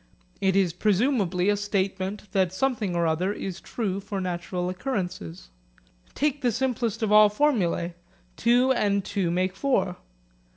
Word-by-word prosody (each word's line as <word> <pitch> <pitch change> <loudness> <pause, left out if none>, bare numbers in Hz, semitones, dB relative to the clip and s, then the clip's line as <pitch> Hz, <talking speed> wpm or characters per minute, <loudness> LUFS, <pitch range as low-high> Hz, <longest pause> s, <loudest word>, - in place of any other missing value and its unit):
It 190 -1 +2
is 190 -4 +2
presumably 200 -2 +1
a 205 - +4
statement 195 -1 -2
that 190 -3 +2
something 215 -3 -1
or 170 0 +1
other 165 +4 +1
is 190 -3 -5
true 200 -5 -3
for 200 0 -5
natural 180 0 -3
occurrences. 180 - -4 0.6
Take 290 -1 0
the 245 -3 +2
simplest 240 -3 -1
of 215 - 0
all 210 0 +8
formulae, 205 - +1 0.4
Two 245 +3 +3
and 200 -5 +1
two 195 -4 -1
make 180 +2 0
four. 195 -7 0
195 Hz, 140 wpm, -26 LUFS, 180-225 Hz, 0.6 s, all